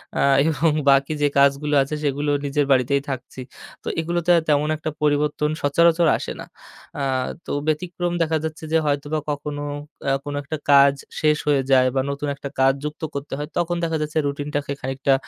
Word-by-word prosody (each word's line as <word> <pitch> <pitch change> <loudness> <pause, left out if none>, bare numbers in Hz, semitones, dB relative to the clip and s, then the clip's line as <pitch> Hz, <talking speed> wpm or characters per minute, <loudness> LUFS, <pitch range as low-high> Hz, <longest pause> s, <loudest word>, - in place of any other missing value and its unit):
এ্যাঁ 140 -1 +3
এবং 160 +1 +2 0.2
বাকি 140 +2 +4
যে 145 - +4
কাজগুলো 140 +2 +3
আছে 145 +3 -4
সেগুলো 145 +1 0
নিজের 145 0 +1
বাড়িতেই 135 +2 +3
থাকছি। 130 0 -6 0.4
তো - - -10
এগুলোতে 170 +1 0 0.2
তেমন 150 0 +2
একটা 155 +1 -4
পরিবর্তন 150 0 +1
সচরাচর 170 +3 +3
আসে - - -5
না। - - -7 0.5
এ্যাঁ 130 -2 -1 0.2
তো - - -6 0.2
ব্যতিক্রম 175 +2 -1
দেখা 160 -1 +1
যাচ্ছে 160 0 -5
যে - - +6
হয়তোবা 145 +1 -1
কখনো 145 0 -4 0.4
এ্যাঁ 135 0 +1
কোন 145 - -4
একটা 155 +2 -4
কাজ 140 0 +7 0.3
শেষ 150 -1 +3
হয়ে 145 -2 +3
যায় 130 -1 +5
বা 130 - +3
নতুন 140 +1 -4
একটা 140 0 -7
কাজ 135 0 +5
যুক্ত 150 +1 -5
করতে 140 0 -5
হয় 150 - -4
তখন 175 0 0
দেখা 165 -1 0
যাচ্ছে 150 +1 -3
রুটিন 145 +1 -4
টাকে 145 -1 -2
খানিকটা 135 +1 0
145 Hz, 180 wpm, -22 LUFS, 140-155 Hz, 0.5 s, কাজ